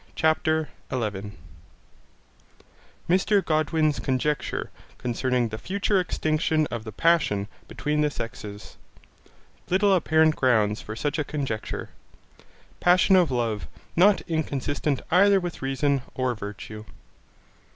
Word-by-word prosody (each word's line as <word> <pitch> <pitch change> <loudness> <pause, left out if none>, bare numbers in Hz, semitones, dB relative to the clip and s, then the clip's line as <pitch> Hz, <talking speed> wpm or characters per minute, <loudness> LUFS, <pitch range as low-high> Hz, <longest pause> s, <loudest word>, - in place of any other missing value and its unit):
CHAPTER 155 0 +1 0.2
11 105 -5 -3 1.7
Mr 190 +3 +3
Godwin's 155 -1 +1
conjecture 140 +3 -1 0.3
concerning 125 0 0
the 110 0 -6
future 200 - 0
extinction 155 -3 0
of 115 -1 -4
the 110 - -6
passion 105 - +2 0.2
between 150 0 -1
the 150 - +2
sexes 105 -6 -8 0.9
Little 195 +2 +3
apparent 160 -3 +3
grounds 110 -5 +2
for 110 - -7
such 145 +6 -2
a - - +1
conjecture 135 -7 -4 0.9
Passion 185 +2 +5
of 180 -3 +4
love 115 -5 -1 0.3
not 195 +4 +5
inconsistent 145 -3 -2
either 195 +3 +5
with 175 -2 -6
reason 135 +1 0
or 130 -1 0
virtue. 105 0 -8
145 Hz, 110 wpm, -25 LUFS, 115-165 Hz, 1.7 s, Passion